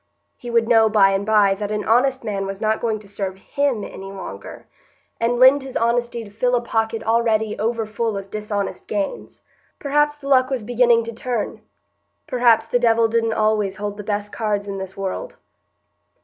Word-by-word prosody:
He 245 - -9
would 230 -1 +2
know 225 -2 +5
by 200 -2 +5
and 195 +1 0
by 210 -2 +4
that 205 +1 -4
an 210 -1 -2
honest 255 +3 +2
man 200 -3 -3
was 195 0 -6
not 220 0 0
going 225 -2 0
to 210 -1 -14
serve 195 -1 -5
him 265 +1 -1
any 195 0 -8
longer, 195 -1 -9 0.5
and 235 +1 +1
lend 260 +3 +6
his 265 -1 -5
honesty 235 0 0
to 205 - -13
fill 245 +4 +1
a 240 - +1
pocket 225 -1 -1
already 220 -1 +1
over 225 +1 -1
full 220 0 -2
of 195 0 -8
dishonest 210 -1 -4
gains. 200 -2 -4 0.3
Perhaps 295 +1 +1
the 290 -2 -11
luck 260 -2 +4
was 260 -5 -2
beginning 240 0 +3
to 230 +1 -6
turn; 240 -1 -3 0.6
perhaps 240 -5 +3
the 245 - 0
Devil 230 -1 +3
didn't 225 0 +1
always 215 -3 +1
hold 205 +1 -4
the 210 - -6
best 205 0 -3
cards 205 -2 -2
in 195 -1 -4
this 190 0 -8
world. 195 - -4
225 Hz, 190 wpm, -21 LUFS, 205-240 Hz, 0.6 s, lend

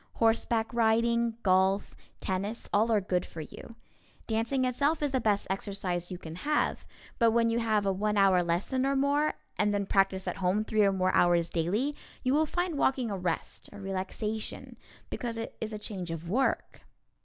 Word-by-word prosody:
Horseback 225 0 +1
riding, 235 0 +2
golf, 190 +1 +2 0.2
tennis, 200 +4 -3
all 220 +3 +3
are 215 - +4
good 180 -2 0
for 160 - -8
you. 225 +9 -10 0.5
Dancing 230 +4 0
itself 285 +5 +1
is 290 - +1
the 260 -1 +1
best 210 -2 +1
exercise 190 -3 -3
you 180 - -5
can 165 -1 -9
have, 300 +9 0 0.3
but 230 -2 +5
when 230 0 +3
you 230 +1 +1
have 215 -3 +1
a 195 - +2
one 210 +2 0
hour 195 -2 +5
lesson 175 +10 0
or 275 +1 +1
more, 285 +2 +2 0.2
and 210 0 +2
then 200 -1 0
practice 195 -1 +1
at - - -2
home 195 +3 +1
three 215 -1 +1
or 200 - +4
more 185 -1 +1
hours 175 -1 +3
daily 210 - 0 0.3
you 255 0 +2
will 310 +2 +3
find 350 -2 -1
walking 255 -4 +1
a - - -1
rest, 175 -2 -4
a 205 - -10
relaxation, 195 +3 -4 0.4
because 235 -2 -4
it 225 - -5
is 220 0 -3
a 215 - -4
change 195 -4 -6
of 165 0 -5
work. 255 +9 0
215 Hz, 185 wpm, -29 LUFS, 190-235 Hz, 0.5 s, but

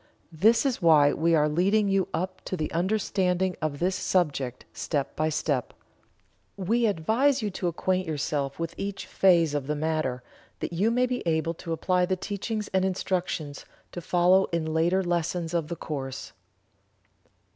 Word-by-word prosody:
This 215 - +3
is 260 -7 0
why 150 -4 +5
we 165 +1 +2
are 150 -1 +3
leading 195 +7 +2
you 195 -1 +1
up 185 +1 -4
to 185 - -3
the 155 - -3
understanding 185 0 0
of 155 -2 -2
this 185 +4 0
subject, 140 -10 -1
step 145 -4 -3
by 155 0 0
step. 145 -5 -1 0.8
We 225 +5 +1
advise 220 - +1
you 210 - -1
to 180 - -3
acquaint 185 +2 -1
yourself 145 -2 -2
with 165 0 -4
each 200 0 -4
phase 170 -5 +3
of 145 -2 -2
the 150 - -1
matter, 155 -5 -1 0.4
that - - -4
you 195 +7 +2
may 250 +2 +2
be 250 0 -2
able 165 0 +1
to 165 0 -8
apply 180 +2 +1
the 185 - +1
teachings 210 +2 -4
and 190 0 +1
instructions 180 -5 -2 0.3
to 175 - -6
follow 180 +3 +4
in 160 -2 -2
later 175 +4 +2
lessons 170 -1 -1
of 165 -3 0
the 170 - -4
course. 135 -5 -6
175 Hz, 165 wpm, -27 LUFS, 155-190 Hz, 0.8 s, why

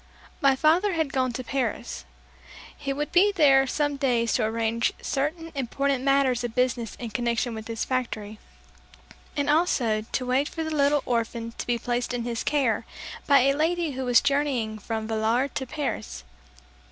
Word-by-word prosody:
My 275 -1 +5
father 335 +8 +3
had 320 -4 -1
gone 255 -1 +1
to 255 - -4
Paris. 245 -2 -3 0.7
He 280 -1 -4
would 295 +2 -3
be 390 +4 +5
there 275 -7 +5
some 290 +1 -1
days 240 -4 +1
to 240 - +1
arrange 225 +1 0
certain 320 +4 -2
important 275 0 -1
matters 275 -3 +2
of 240 -1 -4
business 250 -2 0
in 235 -3 -7
connection 235 +1 -1
with 220 0 -7
his 230 -1 -3
factory, 220 -5 -3 1.0
and 285 0 0
also 290 -9 +2
to 245 +3 -3
wait 260 +4 +1
for 325 - -4
the 315 0 -3
little 285 0 +3
orphan 230 -1 -2
to - - -6
be 240 -1 +1
placed 245 +1 -2
in 240 - -2
his 235 -1 -3
care 260 -7 +1 0.4
by 280 -2 +6
a 275 +2 +3
lady 330 +1 0
who 265 0 -4
was 245 -2 +5
journeying 275 -6 0
from 220 +1 -4
Villar 225 +4 +1
to 265 -3 -4
Paris. 250 - -4
255 Hz, 170 wpm, -26 LUFS, 230-285 Hz, 1.0 s, by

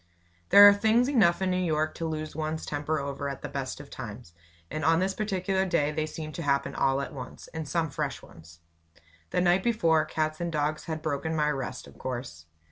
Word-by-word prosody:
There 205 0 +10
are 205 - +9
things 220 +4 +3
enough 195 -10 +3
in 185 - +1
New 180 0 +1
York 155 -2 0
to 165 - -2
lose 155 -1 -4
one's 155 0 -3
temper 150 +2 -2
over 140 0 -3
at 135 - -7
the - - -3
best 140 -1 -4
of 145 -1 -11
times, 110 -6 -8 0.4
and 155 - -3
on 165 +2 +4
this 190 +1 0
particular 190 -2 -1
day 170 -5 +1
they 155 0 -2
seemed 155 -1 -7
to - - -5
all 150 - -5
happen 140 0 +1
at 135 +1 0
once, 130 -3 -9
and 160 -2 -6
some 165 -3 0
fresh - - -3
ones. 80 0 -16 0.7
The - - +1
night 180 +1 +4
before, 165 -9 +2
cats 155 +1 -2
and 170 0 -2
dogs 150 0 -1
had 160 -1 -4
broken 160 +1 -2
my 150 -1 +2
rest, 135 -2 -4
of - - -16
course. 120 - -6
155 Hz, 210 wpm, -28 LUFS, 140-175 Hz, 0.7 s, There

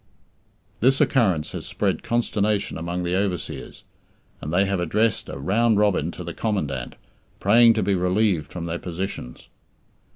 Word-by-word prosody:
This 130 +3 +3
occurrence 95 - +2
has - - -6
spread - - -1
consternation 105 -3 0
among 85 +2 -3
the 90 +1 -1
overseers, 95 -2 -3 0.6
and 75 - -5
they 95 +4 +3
have 100 -1 -1
addressed 105 +6 0
a - - -6
"round 105 +9 +2
robin" 100 -6 +2
to 90 - -7
the 85 0 -6
Commandant, 105 -8 -2 0.4
praying 115 +3 +6
to 110 - 0
be 100 +1 +1
relieved 90 -3 +1
from 85 -2 -5
their 85 0 -3
positions. 85 -8 -6
95 Hz, 150 wpm, -23 LUFS, 85-110 Hz, 0.6 s, praying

